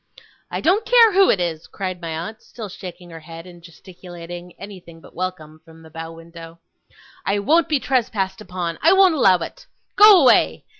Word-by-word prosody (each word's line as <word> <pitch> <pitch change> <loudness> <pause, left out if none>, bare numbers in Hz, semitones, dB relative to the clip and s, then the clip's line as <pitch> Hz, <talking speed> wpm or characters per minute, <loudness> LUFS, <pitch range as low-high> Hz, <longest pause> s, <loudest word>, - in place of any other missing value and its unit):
'I - - -5
don't 385 +6 +2
care 460 -3 +5
who 390 +1 +4
it 195 - +2
is!' 165 -3 -4
cried 185 -2 -6
my 165 - -6
aunt, 170 +8 -6
still 220 -4 -10
shaking 180 -2 -11
her 165 - -10
head 165 +1 -12
and 175 -1 -15
gesticulating 175 0 -12
anything 180 -5 -12
but - - -18
welcome 160 -4 -7
from 160 0 -18
the 160 - -16
bow 165 0 -8
window. 165 0 -13 0.7
'I 200 - +1
won't 310 +12 +1
be 300 -3 +1
trespassed 215 -8 -2
upon. 180 -4 -6
I 330 +5 +5
won't 385 -2 +5
allow 195 -11 +4
it. - - -9 0.3
Go 415 -2 +8
away! 255 - +3
180 Hz, 185 wpm, -20 LUFS, 165-245 Hz, 0.7 s, Go